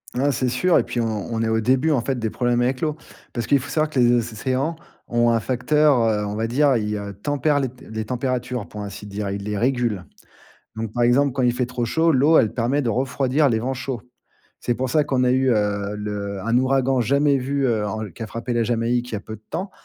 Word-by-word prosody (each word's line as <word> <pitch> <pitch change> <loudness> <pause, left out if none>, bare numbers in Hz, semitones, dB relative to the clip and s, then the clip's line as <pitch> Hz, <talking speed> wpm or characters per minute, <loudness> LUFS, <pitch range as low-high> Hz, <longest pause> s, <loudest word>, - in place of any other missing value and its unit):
Ah, 140 +3 +2
c'est 130 0 -1
sûr. 170 +9 +3
Et - - +1
puis 120 - -4
on 110 0 -3
on 115 - -1
est 110 - 0
au 110 0 +2
début 130 +7 +2
en 135 -5 +2
fait 130 +2 -2
des 115 -2 -2
problèmes 120 +1 0
avec 125 +1 0
l'eau. 155 -2 0 0.4
Parce 120 -1 -2
qu'il 140 - +3
faut 125 - -8
savoir 155 -1 +1
que 140 - -1
les 120 -1 +5
océans 130 +6 -1 0.3
ont 120 0 +3
un 115 - +2
facteur, 140 +4 +2
heu, 105 -2 +1
on 105 0 -4
va 110 +1 -1
dire, 140 +5 +3
heu, 125 - +3
ils 105 -1 -2 0.2
tempèrent 145 0 +1
les 135 -2 -1
t 125 +1 -16
les 110 0 -4
températures 125 -1 -2
pour 105 - -8
ainsi 100 0 -7
dire, 100 0 -4
ils 100 0 -4
les 105 0 -3
régulent. 120 -5 0 0.7
Donc, 110 -1 -4
par 120 - 0
exemple 130 +3 +3
quand 130 0 -1
il 120 -1 +3
fait 125 0 -1
trop 125 -1 -3
chaud, 160 +7 +2
l'eau, 145 +4 +5
elle 110 - +3
permet 130 +5 +1
de 125 - -1
refroidir 135 +4 +1
les 115 -3 +1
vents 130 +4 -2
chauds. 130 -3 -5 0.6
C'est 120 - 0
pour 130 +1 -2
ça 150 +2 +3
qu'on 130 -3 0
a 125 - +3
eu, 130 0 +2
heu, 105 -2 0
le 100 -1 -4
un 115 +5 0
ouragan 130 0 +2
jamais 140 +4 +3
vu, 135 +1 0
heu, 110 -4 +1
en 110 +1 -4
qui 90 - -9
a - - -3
frappé 115 +3 -4
la 120 0 +2
Jamaïque, 120 +1 0
il - - -2
y - - 0
a - - -5
peu 110 +1 -8
de 110 - -24
temps. 190 +2 -3
120 Hz, 255 wpm, -22 LUFS, 110-135 Hz, 0.7 s, les